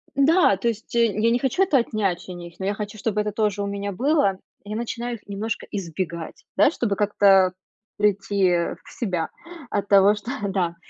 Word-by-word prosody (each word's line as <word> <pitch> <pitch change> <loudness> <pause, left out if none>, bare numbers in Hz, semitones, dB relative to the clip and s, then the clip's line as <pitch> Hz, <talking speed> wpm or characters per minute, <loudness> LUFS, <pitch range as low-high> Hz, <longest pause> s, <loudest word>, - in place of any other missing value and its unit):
Да, 285 - +4
то 235 - -2
есть, 225 0 -3
э, 235 0 +5
я 220 +2 +1
не 240 - +2
хочу 275 +9 +2
это 310 -8 +3
отнять 195 -7 -1
у 180 - -6
них, 175 -1 -10
но 190 - -3
я 200 - +1
хочу, 210 +1 -6
чтобы 210 0 -1
это 210 0 -2
тоже 210 -1 0
у - - -2
меня 200 0 -3
было, 235 - +1 0.2
и 205 - -12
я - - -2
начинаю 235 +1 -3
их 205 - -16
немножко 205 +3 -4
избегать, 170 -3 -5
да, - - +6
чтобы 210 -10 -1
как-то 195 -2 +4 0.4
прийти, 200 -1 +2
э, 170 -1 0
в - - -15
себя 180 -8 -2 0.4
от 200 0 -2
того, 200 +1 +6
что, 210 +5 -6 0.2
да, 180 -3 -1
205 Hz, 205 wpm, -23 LUFS, 190-230 Hz, 0.4 s, да